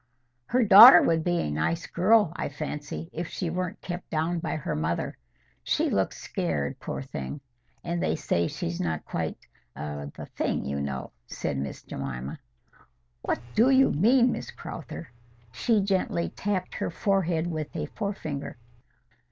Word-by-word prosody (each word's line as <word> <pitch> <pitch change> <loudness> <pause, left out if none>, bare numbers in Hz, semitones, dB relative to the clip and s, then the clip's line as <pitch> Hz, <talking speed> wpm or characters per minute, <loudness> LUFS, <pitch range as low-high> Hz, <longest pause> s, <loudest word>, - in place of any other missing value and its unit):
"Her 250 +1 +3
daughter 195 -4 +11
would 165 -1 +2
be 175 0 +1
a 75 - -2
nice 80 - -1
girl, 200 0 +3
I - - -3
fancy, 150 +2 -5
if 170 +1 -3
she 170 -2 -3
weren't 185 +3 -3
kept 175 0 -6
down 165 +2 0
by 160 -2 -3
her 150 - -3
mother. 80 +3 -2 0.5
She - - +1
looks - - 0
scared, 70 -3 -2
poor - - -5
thing! 70 - -6 0.4
And 170 0 -2
they - - +1
say 85 - 0
she's 85 +1 -4
not 80 -3 -2
quite—the 70 +3 -6
thing, - - -1
you 70 +1 -2
know," 65 -2 -4 0.2
said 70 - -3
Miss 70 0 -5
Jemima. 65 -1 -5 0.8
"What - - -1
DO 235 +4 +5
you 270 0 +5
mean, 240 - +4
Miss - - -5
Crowther?" 155 - -8 0.4
She 225 - +2
gently 190 -3 0
tapped 190 -2 -3
her - - -2
forehead 175 -3 0
with 155 -3 -4
a - - -2
forefinger. 160 - -5
160 Hz, 150 wpm, -27 LUFS, -, 0.8 s, daughter